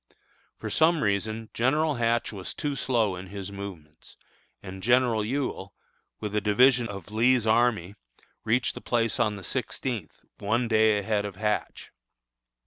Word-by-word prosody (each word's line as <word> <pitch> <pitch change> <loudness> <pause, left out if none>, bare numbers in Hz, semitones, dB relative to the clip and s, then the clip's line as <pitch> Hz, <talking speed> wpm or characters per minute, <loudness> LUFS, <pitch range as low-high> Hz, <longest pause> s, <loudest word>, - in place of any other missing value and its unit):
For - - -6
some 160 0 +3
reason 110 +2 -1
General 150 +6 +2
Hatch 115 0 0
was 95 -2 -6
too 145 -1 -2
slow 115 -7 +1
in 90 +1 -8
his 100 0 -7
movements, 90 -6 -10 0.5
and 95 -1 -8
General 120 -1 +3
Ewell, 110 -6 -3 0.4
with 105 -1 -4
a 105 - +2
division 120 +4 +4
of 100 -1 -8
Lee's 120 +2 +3
army, 110 -5 +2 0.5
reached 120 +3 +1
the - - -9
place 115 -2 0
on 105 -1 +2
the 95 - -9
sixteenth, 110 0 -4 0.2
one 115 +4 0
day 110 -1 +4
ahead 105 0 0
of 100 -2 -6
Hatch. 105 +2 -3
110 Hz, 145 wpm, -27 LUFS, 100-120 Hz, 0.5 s, division